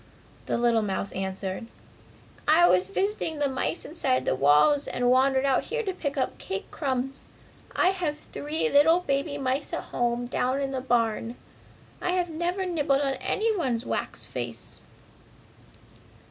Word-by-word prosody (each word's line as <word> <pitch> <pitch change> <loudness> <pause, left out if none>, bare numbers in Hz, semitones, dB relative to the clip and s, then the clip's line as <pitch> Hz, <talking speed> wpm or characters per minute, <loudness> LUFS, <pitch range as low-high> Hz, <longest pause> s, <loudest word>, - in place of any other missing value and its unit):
the - - 0
little 235 -1 +3
mouse 200 -1 -2
answered. 190 +2 -4 0.8
"I 330 +3 +6
was 180 0 +3
visiting 385 - -1
the 290 -1 +1
mice 265 +5 -2
inside 275 -5 0
the - - +2
walls 150 - +4
and 245 0 +1
wandered 265 +1 +3
out 270 -1 +2
here 475 0 -2
to 385 -3 -2
pick 285 -5 -4
up 260 - -1
cake 190 0 -5
crumbs! 270 -2 -3 0.5
I 365 - +4
have 350 -6 -2
three 305 +9 -1
little 325 -1 +5
baby 285 -1 -1
mice 270 +1 -2
at - - -2
home 240 0 0
down 255 +2 0
in 275 -1 -2
the 265 -1 -2
barn. 230 -2 0 0.7
I 360 - 0
have 355 -2 0
never 350 +4 -1
nibbled 295 -6 +1
at 275 -1 -1
anyone's 340 - 0
wax - - -3
face!" - - -7
275 Hz, 150 wpm, -27 LUFS, 240-325 Hz, 0.8 s, I